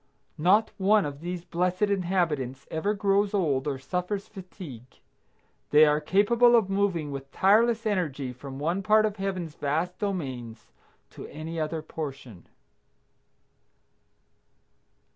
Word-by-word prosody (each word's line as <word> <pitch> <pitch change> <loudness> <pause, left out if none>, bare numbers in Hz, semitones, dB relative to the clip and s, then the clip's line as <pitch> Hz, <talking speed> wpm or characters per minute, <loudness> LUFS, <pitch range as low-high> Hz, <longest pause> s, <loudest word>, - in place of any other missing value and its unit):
Not 195 +7 +4
one 205 0 +4
of 145 -1 -6
these 175 0 -5
blessed 180 +3 -1
inhabitants 175 -10 0
ever 200 +7 -1
grows 200 0 +1
old 150 -8 0
or 140 -2 -1
suffers 180 +8 -3
fatigue. 175 - -11 0.7
They 150 +1 +7
are 150 0 +2
capable 235 +8 +4
of 210 -4 +2
moving 190 -7 0
with 135 0 -7
tireless 225 +4 +3
energy 150 -11 -1
from 135 +2 -9
one 170 +7 -1
part 215 +2 +4
of 215 -1 -2
Heaven's 185 -5 -3
vast 160 +6 -2
domains 130 - -5 0.4
to - - -9
any 160 +2 -6
other 155 0 -2
portion. 135 - -8
175 Hz, 125 wpm, -27 LUFS, 145-200 Hz, 0.7 s, They